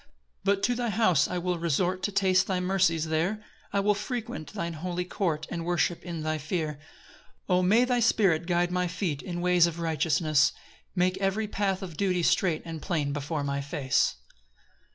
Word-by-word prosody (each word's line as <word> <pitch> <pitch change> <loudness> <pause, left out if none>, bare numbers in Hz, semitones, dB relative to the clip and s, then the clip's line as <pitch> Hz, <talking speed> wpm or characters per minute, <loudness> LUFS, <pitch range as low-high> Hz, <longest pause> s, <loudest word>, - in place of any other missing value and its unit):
4 - - -29 0.4
But 195 0 +2
to 245 - +3
thy 240 -1 -1
house 185 -8 +3
will 180 0 -1
I - - -4
resort, 175 +3 0
To 205 - -1
taste 190 -1 +3
thy 185 -2 0
mercies 180 -3 +2
there; 180 +7 0 0.3
I 200 - +1
will 210 +1 +3
frequent 210 -6 -5
thine 170 -5 -4
holy 180 +2 -3
court, 165 -4 -2
And 170 -1 -3
worship 175 0 0
in 170 -2 -5
thy 155 0 -1
fear. 155 -1 -3 0.7
5 - - -43
O - - +3
may 215 +7 +4
thy 250 -1 +1
Spirit 190 -8 +3
guide 175 0 +1
my 180 0 0
feet 170 -4 -2
In 175 -2 -5
ways 180 -1 +4
of 170 0 -5
righteousness! 155 -2 +2 0.4
Make 185 +1 +1
every 195 +3 0
path 195 -2 -1
of 170 -5 -8
duty 180 -2 +1
straight 170 -2 +2
And 165 -2 -6
plain 150 -6 -1
before 145 +1 -3
my 140 0 -2
face. 140 - 0
PAUSE. - - -30
175 Hz, 195 wpm, -28 LUFS, 160-195 Hz, 0.7 s, may